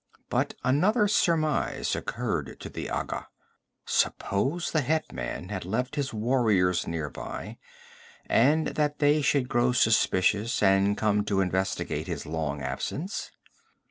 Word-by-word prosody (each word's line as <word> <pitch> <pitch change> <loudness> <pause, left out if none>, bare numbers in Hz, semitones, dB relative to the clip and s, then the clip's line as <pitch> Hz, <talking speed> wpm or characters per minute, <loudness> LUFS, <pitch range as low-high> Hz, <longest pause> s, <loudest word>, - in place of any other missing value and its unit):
But - - 0
another 200 - +3
surmise 160 -7 +1
occurred - - -3
to - - -6
the - - -6
Agha. - - -3 0.6
Suppose 135 - 0
the 155 - +2
hetman 90 - -2
had 100 -3 -4
left 125 - -2
his 140 -3 -1
warriors 105 -6 +2
near 80 -2 -2
by, - - -7 0.7
and 150 +7 +3
that 150 -1 -1
they 150 +1 +3
should 140 -2 +2
grow 120 0 +2
suspicious 105 -1 +2
and 95 +1 +4
come 105 -1 +2
to 100 -2 0
investigate 95 0 -1
his - - -4
long 75 -3 -3
absence? 140 - -4
115 Hz, 125 wpm, -27 LUFS, 95-145 Hz, 0.7 s, and